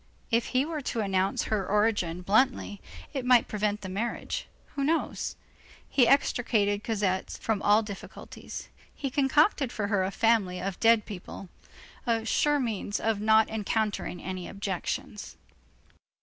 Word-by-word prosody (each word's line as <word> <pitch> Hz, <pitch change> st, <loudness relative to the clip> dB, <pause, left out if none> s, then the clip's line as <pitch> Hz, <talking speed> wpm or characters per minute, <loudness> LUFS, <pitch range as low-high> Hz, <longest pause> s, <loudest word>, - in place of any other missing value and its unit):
If 230 Hz, 0 st, +2 dB
he 260 Hz, +2 st, +1 dB
were 315 Hz, -1 st, -4 dB
to 235 Hz, -4 st, -2 dB
announce 195 Hz, -1 st, +1 dB
her 215 Hz, -3 st, -1 dB
origin 205 Hz, -5 st, +1 dB
bluntly, 215 Hz, 0 st, +1 dB, 0.3 s
it 270 Hz, -3 st, -2 dB
might 250 Hz, -1 st, +5 dB
prevent 210 Hz, 0 st, -1 dB
the 190 Hz, -, -6 dB
marriage, 235 Hz, -, -3 dB, 0.3 s
who 280 Hz, -, -2 dB
knows? 320 Hz, +4 st, -1 dB, 0.5 s
He 250 Hz, -4 st, +4 dB
extricated 215 Hz, -6 st, +2 dB
Cosette 200 Hz, -4 st, -1 dB
from 220 Hz, -3 st, -1 dB
all 210 Hz, +2 st, +4 dB
difficulties. 200 Hz, -2 st, -9 dB, 0.3 s
He 275 Hz, -2 st, -4 dB
concocted 280 Hz, -, +3 dB
for 205 Hz, -2 st, -3 dB
her 200 Hz, -3 st, +2 dB
a 190 Hz, -, 0 dB
family 205 Hz, -4 st, +2 dB
of 190 Hz, 0 st, -4 dB
dead 225 Hz, -1 st, +5 dB
people, 190 Hz, -1 st, -8 dB, 0.6 s
a 225 Hz, -1 st, +1 dB
sure 295 Hz, +5 st, +2 dB
means 215 Hz, -5 st, -2 dB
of 220 Hz, -2 st, 0 dB
not 220 Hz, 0 st, +5 dB
encountering 215 Hz, -4 st, -2 dB
any 185 Hz, -1 st, -5 dB
objections. 200 Hz, +1 st, -4 dB
215 Hz, 140 wpm, -28 LUFS, 200-240 Hz, 0.6 s, might